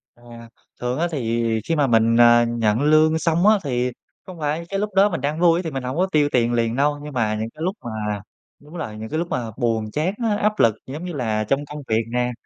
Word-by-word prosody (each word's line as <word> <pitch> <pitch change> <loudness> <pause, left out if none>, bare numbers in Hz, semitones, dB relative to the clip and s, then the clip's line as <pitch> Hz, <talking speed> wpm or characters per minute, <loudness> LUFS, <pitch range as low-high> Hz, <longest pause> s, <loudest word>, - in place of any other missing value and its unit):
À, 120 -1 -13 0.3
thường 125 +4 -2
á 175 - +1
thì 115 -5 -1 0.2
khi 165 - 0
mà 145 -3 +2
mình, 115 -1 +3
à, 120 0 +6
nhận 115 0 0
lương 155 +2 +4
xong 170 +4 +2
á 215 0 +6
thì 125 -2 -1 0.3
không 180 -3 -10
phải 155 +3 -2
cái 195 - -2
lúc 210 0 -3
đó 195 +2 +5
mình 170 -8 -4
đang 150 +3 -2
vui 170 -1 +4
á - - -1
thì 160 - -4
mình 135 -1 -4
hổng 130 +5 -4
có 185 - +2
tiêu 150 -1 +3
tiền 120 -1 +2
liền 115 -1 0
đâu, 145 +2 +1
nhưng 150 -1 -8
mà 110 -3 0
những 110 +1 -3
cái 155 - -15
lúc 185 +3 -1
mà 105 -2 -3 0.4
đúng 150 +3 -17
rồi, 110 -8 -5
những 110 +1 -7
cái 155 - -2
lúc 170 - -2
mà 115 -3 -3
buồn 115 -4 -1
chán 160 +6 -1
á, 215 -2 +1
áp 210 0 0
lực, 115 -2 +4
giống 150 +7 -7
như 175 - -5
là 110 -6 -1
trong 135 +7 -1
công 150 +1 -8
việc 110 +1 +1
nè, 125 0 0
135 Hz, 260 wpm, -22 LUFS, 115-160 Hz, 0.4 s, à